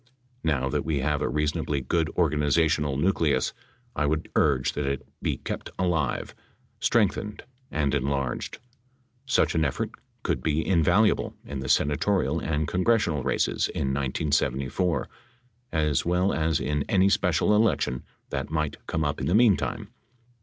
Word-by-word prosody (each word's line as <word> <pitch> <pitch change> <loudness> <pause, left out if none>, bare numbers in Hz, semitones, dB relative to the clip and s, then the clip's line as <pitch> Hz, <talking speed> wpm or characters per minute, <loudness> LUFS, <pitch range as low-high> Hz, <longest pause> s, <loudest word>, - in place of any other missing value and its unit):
Now 70 -4 +1
that 65 - -1
we 75 -4 -1
have 75 +1 0
a - - 0
reasonably 75 -1 -1
good 80 +5 0
organiza 75 -1 +3
tional 75 -3 0
nucleus, 80 -2 +1 0.4
I 75 - +1
would 80 +1 -2
urge 65 -3 +2
that 75 -1 -2
it 70 -1 -3
be - - -1
kept - - -5
alive, 85 -7 -1 0.5
strengthened 105 -1 +1 0.3
and 75 -3 0
enlarged. 70 -2 -1 0.7
Such 130 - +2
an 80 -2 +2
effort 70 - -1 0.3
could - - -1
be 80 +1 0
invaluable 95 +5 +3
in 70 -2 -5
the 65 0 -5
sena 75 0 +3
torial 85 -6 +1
and 75 -1 -1
congressional 90 -4 +1
races 65 0 0
in 65 -1 -2
1974, 70 +4 0 0.6
as 75 -3 +1
well 90 +3 +1
as 80 -1 +1
in 75 +1 -1
any 95 0 +4
special 95 +1 +2
election 105 - +1 0.3
that 70 -1 -3
might 75 -2 -2
come 80 -1 -1
up 75 0 -2
in - - -1
the 90 - +2
meantime. 110 -4 +2
75 Hz, 145 wpm, -26 LUFS, 70-85 Hz, 0.7 s, any